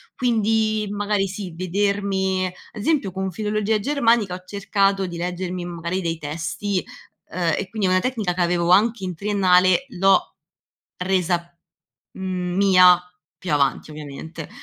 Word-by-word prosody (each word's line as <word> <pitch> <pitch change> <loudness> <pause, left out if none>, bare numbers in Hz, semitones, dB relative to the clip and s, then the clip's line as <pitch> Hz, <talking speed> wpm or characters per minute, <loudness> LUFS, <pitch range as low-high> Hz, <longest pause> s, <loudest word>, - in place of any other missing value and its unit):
Quindi, 220 -3 +1
magari 205 -1 0
sì, 195 -1 -6
vedermi 190 +1 0 0.2
esempio 215 - 0
con 190 0 -3
filologia 215 +2 0
germanica, 230 -6 +2
ho 180 - -10
cercato 195 -1 0
di 175 - -6
leggermi 180 +1 -4
magari 170 +1 -3
dei 165 -2 -2
testi 170 +6 -3 0.5
uhm, 170 -3 0
e 195 - -3
quindi 210 -3 -1
è - - +1
una 185 - +4
tecnica 220 -6 -1
c'avevo 175 -1 0
anche 220 +2 +4
in 185 -1 -3
triennale, 185 +3 +3
l'ho 195 -3 +2 0.6
resa, 180 -2 -1 0.6
mhmm, 180 -1 -3
mia 185 -2 +6 0.4
più 185 - -5
avanti, 140 +1 +1
ovviamente. 155 +2 -8
185 Hz, 130 wpm, -22 LUFS, 175-205 Hz, 0.6 s, mia